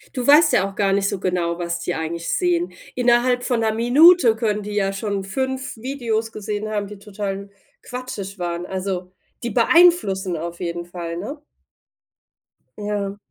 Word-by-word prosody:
Du 250 -2 -2
weißt 305 +2 +7
ja 195 0 +3
auch 195 - -13
gar 195 -2 +2
nicht 200 0 +1
so 200 - -3
genau, 175 -2 -1
was 170 -1 -3
die 175 0 -3
eigentlich 165 +1 -4
sehen. 350 -1 0 0.2
Innerhalb 245 0 +2
von 245 -2 0
’ner 220 -1 +1
Minute 245 +3 +6
können 215 -2 -1
die 205 0 -6
ja 195 -1 +1
schon 200 0 -3
5 265 +6 -3
Videos 230 -3 -2
gesehen 215 0 -4
haben, 210 -1 -2
die 205 0 -10
total 200 -1 -4
n 200 +1 -9 0.3
quatschig 230 -6 -6
waren. 175 0 -3
Also 185 -1 -4 0.3
die 235 - -2
beeinflussen 225 - +4
auf 170 +2 -6
jeden 170 -1 -4
Fall, 170 -1 -6
ne? 280 - -6 1.3
Ja. 205 -1 -3
205 Hz, 165 wpm, -22 LUFS, 185-245 Hz, 1.3 s, weißt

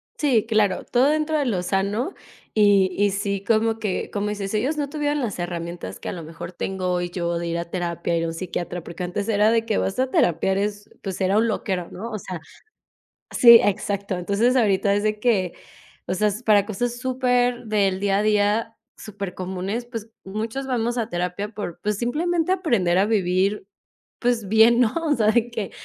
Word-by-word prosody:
Sí, 250 -8 +2
claro, 215 -4 +2
todo 255 +3 +2
dentro 310 +1 +1
de 290 - 0
lo 205 -8 0
sano 200 - -1 0.4
y 205 -3 +5
y 205 0 +3
sí, 200 0 -2
como 225 +1 +2
que 210 -4 -3
como 205 0 -2
dices, 200 -2 -4
ellos 260 +9 0
no 290 -2 -2
tuvieron 295 0 -1
las 235 -7 -3
herramientas 175 -1 -5
que - - -5
a - - -2
lo 170 - -7
mejor 165 +2 -8
tengo 185 +1 -3
hoy 175 0 -1
yo 170 -1 -2
de 170 - -3
ir 170 0 -2
a 170 - -3
terapia, 170 -1 -2
ir 165 - 0
a - - -1
un 165 - -4
psiquiatra, 175 0 -4
porque 170 +2 -7
antes 180 +4 -3
era 210 0 +4
de 230 -1 +2
que, 220 -3 0
¿vas 195 - -1
a 260 0 +1
terapia? 175 -3 +2
Eres 205 +1 -2
pues 195 -1 -5
era 190 +2 +2
un 225 +2 +3
loquero, 190 -5 -2
¿no?, 220 +6 -6
o 215 - -3
sea 185 -2 -6 0.9
Sí, 235 -2 +9
exacto. 200 -1 -1
Entonces 205 +8 +1
ahorita 200 -5 +3
es 205 - 0
de 215 0 0
que, 205 -6 +1 0.5
o - - -1
sea, 210 +3 +2
es 205 +3 -5
para 210 -3 +4
cosas 235 +3 -2
súper 250 -1 +1
del 200 -3 +1
día 195 0 +1
a - - +1
día, 215 +2 +1 0.2
supercomunes. 195 +2 -5
Pues 230 -2 -7
muchos 220 +7 -4
vamos 240 -2 -1
a 230 -2 -1
terapia 180 +2 -2
por, 205 -6 -6
pues 210 -1 0
simplemente 325 +8 0
aprender 235 - +2
a 195 - +4
vivir, 195 -1 +1 0.5
pues 240 -4 0
bien, 220 +3 +5
¿no?, 235 -3 +3
o 300 -2 +2
sea, 220 -4 +1
de 235 +1 +1
que 220 -4 -4
205 Hz, 200 wpm, -23 LUFS, 185-235 Hz, 0.9 s, Sí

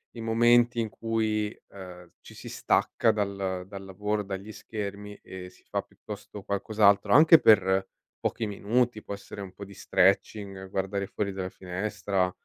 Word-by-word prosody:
i - - -8
momenti 120 +1 +4
in 110 - -2
cui, 110 0 -1
ehm, 90 -2 -11
ci - - -14
si - - -10
stacca - - +2
dal 100 -3 -2
dal 100 0 -8
lavoro, 105 +2 -2
dagli 100 +2 -6
schermi 105 -1 -6
e 90 -1 -8
si - - -23
fa - - -2
piuttosto 105 -1 -10
qualcos'altro, 100 0 +2
anche 160 +2 +8
per 95 -2 +4 0.3
pochi 115 - -2
minuti, 110 +3 0
può 100 - -6
essere 100 0 -9
un 95 -2 -7
po' 100 +1 -9
di 100 - -13
stretching, 95 0 +1
guardare 95 +1 -2
fuori 100 0 -3
dalla 95 -1 -4
finestra, 95 0 -2
100 Hz, 155 wpm, -28 LUFS, 95-110 Hz, 0.3 s, anche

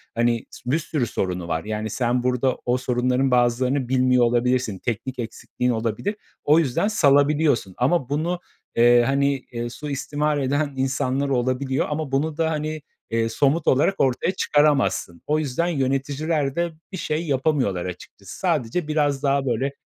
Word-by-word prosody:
hani, 120 0 +1
s 125 - -6
bir 155 - +2
sürü 150 -6 -2
sorunu 90 -4 -3
var, 80 -1 -2
yani, 110 0 -3
sen 120 +2 0
burada 125 +1 +1
o 125 +1 +2
sorunların 125 +1 0
bazılarını 125 +2 +2
bilmiyor 125 -1 +3
olabilirsin, 120 -2 +1
teknik 125 +4 -4
eksikliğin 120 +2 -3
olabilir. 115 - -2 0.3
O 150 +3 +5
yüzden 165 +6 +1
salabiliyorsun. 145 - +3
Ama 135 +1 +1
bunu, 165 +5 -1 0.4
eee, 120 +1 +6
hani, 140 +1 +1
eee, 120 0 -4
suistimal 145 +3 -2
eden 145 +2 0
insanlar 135 +1 0
olabiliyor 130 +1 0
ama 150 -2 -3
bunu 150 +3 0
da, 160 -1 +1
hani, 155 0 -3 0.3
eee, 115 0 +1
somut 140 +7 +1
olarak 145 +9 +3
ortaya 135 +6 +1
çıkaramazsın. 145 - +1
O 150 +1 +2
yüzden 155 +3 -1
yöneticiler 140 0 -1
de 170 0 0 0.2
bir 190 - -5
şey 160 +1 -2
yapamıyorlar 135 - 0
açıkçası. 90 +1 -9
Sadece 160 -2 0
biraz 145 -2 0
daha 140 0 +2
böyle 130 +2 0
135 Hz, 150 wpm, -23 LUFS, 120-150 Hz, 0.4 s, eee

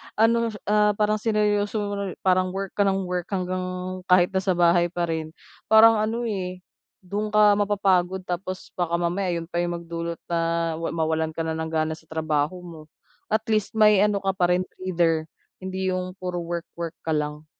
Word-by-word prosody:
ano, 230 +1 +3 0.2
ah, 210 0 +3
parang 215 +1 +1
sineryoso 210 -1 +1
mo, 205 0 -3 0.3
parang 185 -1 +2
work 195 -1 -3
ka 205 - +3
nang 195 0 +1
work 180 -1 -3
hanggang 185 -1 -2 0.4
kahit 180 -1 +5
nasa 190 -1 0
bahay 175 0 +4
pa 175 0 -3
rin 160 0 -4 0.3
parang 220 0 +7
ano, 225 +3 -1
eh, 185 -5 -4 0.4
dun 205 +4 -3
ka 210 -1 +6
mapapagod 190 -3 +1
tapos 185 +1 -5
baka 170 -2 0
mamaya 180 +2 -1
'yun 165 0 -4
pa 170 - -1
'yung 175 0 -1
magdulot 170 0 -4
na 165 0 0
ma 165 - -2
mawalan 160 0 -1
ka 165 - -2
na 160 0 -2
ng 160 0 -3
gana 160 0 0
sa 160 - -20
trabaho 155 0 -1
mo. 165 -3 -10 0.5
At 220 +1 0
least 215 0 0
may 210 -2 +6
ano 205 -1 +2
ka 195 - +2
pa 180 -2 +2
rin 180 +1 +1 0.2
breather, 165 -4 +1 0.3
hindi 190 0 -2
'yung 185 0 -3
puro 180 -1 -4
work-work 170 -1 -5
ka 160 - 0
lang. 150 0 -2
185 Hz, 180 wpm, -24 LUFS, 170-205 Hz, 0.5 s, parang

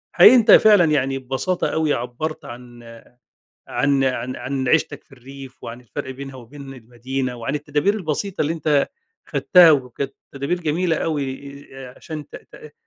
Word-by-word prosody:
حقيقي 255 - +8
أنتَ 230 -3 +5
فعلًا 205 -6 +7
يعني 135 -3 0
ببساطة 135 +8 -2
أوي 155 -2 0
عبرت 145 +6 -5
عن 120 -1 -11 0.8
عن 140 -1 +1
عن 130 -1 -2
عن 130 -1 -4
عيشتك 160 +5 0
في - - -35
الريف 135 0 -13
وعن 120 +2 -8
الفرق 125 +3 -7
بينها 135 0 -9
وبين 135 +3 -11
المدينة 125 +2 -5
وعن 120 +4 -4
التدابير 150 +6 0
البسيطة 195 0 -3
اللي 155 +2 0
أنتَ 150 -3 +1 0.4
أخدتها 175 -3 +5
وكانت 135 -1 -2 0.2
تدابير 140 +6 -3
جميلة 165 +2 0
أوي 140 -2 -4
عشان 135 +3 -9
ت - - -11
ت 150 -1 -14
140 Hz, 150 wpm, -21 LUFS, 130-155 Hz, 0.8 s, حقيقي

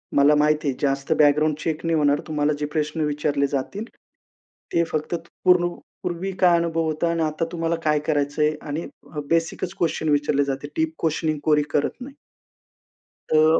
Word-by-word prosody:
मला 145 +1 +6
माहिती 150 0 +2
आहे 135 - 0
जास्त 140 -1 0
बॅकग्राऊंड 150 +1 +4
चेक 160 0 -3
नाही 165 -1 +2
होणार. 145 -1 +3
तुम्हाला 150 -1 +1
जे 150 - -1
प्रश्न 155 +1 -1
विचारले 145 -1 0
जातील 145 +10 -3 0.9
ते 170 - +3
फक्त 155 +2 -1 0.3
पूर्ण 180 -1 +5 0.3
पूर्वी 175 +3 -3
काय 175 -2 +5
अनुभव 165 -1 0
होता 160 +2 0
आणि 165 -1 -1
आता 155 +1 -1
तुम्हाला 165 -1 -1
काय 150 -1 +3
करायचंय 150 0 +1
आणि 155 +3 -4 0.4
बेसिकच 165 +2 0
क्वेशन 160 -2 0
विचारले 145 -1 +2
जाते. 140 +1 -3
दीप 320 0 +1
क्वेशनिंग 155 -1 0
कोरी 150 -1 +4
करत 145 - -1
नाही. 270 +3 -8 1.2
त - - +3
अ 155 +1 +5
155 Hz, 165 wpm, -23 LUFS, 145-165 Hz, 1.2 s, मला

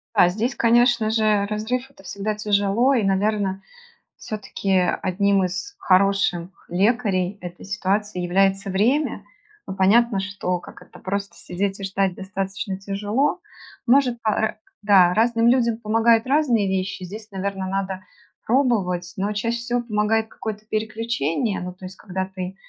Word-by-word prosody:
А, 175 - +6
здесь 220 +8 -1
конечно 235 -1 +3
же 215 -2 +2
разрыв- 245 +5 -3
это 235 - -18
всегда 200 +3 -3
тяжело 210 +5 +2
и, 235 - +2
наверное, 195 0 0 0.6
всё-таки 205 -2 -5 0.3
1 195 +1 +2
из 185 - -4
хороших 195 - +1
лекарей 200 -1 +1
этой 175 0 -9
ситуации 205 -1 -1
является 195 +2 +1
время. 240 +11 +1 0.4
Ну, 190 - -5
понятно, 200 +2 +4
что, 190 -2 -2
как 175 - -13
это, - - -15
просто 200 +1 -4
сидеть 195 +2 -3
и - - -7
ждать 195 -1 0
достаточно 195 0 -4
тяжело. 210 - -1 0.5
Может 250 -2 +3
по 220 - 0
Э, 220 +1 0 0.3
да. 190 -4 +5
Разным 230 +2 +2
людям 235 -2 +3
помогают 225 0 +3
разные 255 -8 +2
вещи. 190 0 -2
Здесь, 215 +4 -9
наверно, 195 0 -3
надо 190 0 -3 0.4
пробовать, 195 -9 +1
но 200 +2 -1
чаще 230 +3 -1
всего 240 +1 -1
помогает 220 0 0
какое-то 215 -1 -6
переключение. 220 - -1
Ну, 180 0 -5
то 185 0 -12
есть, 185 +1 -9
когда 190 -2 -4
ты 185 0 -6
200 Hz, 145 wpm, -22 LUFS, 190-225 Hz, 0.6 s, А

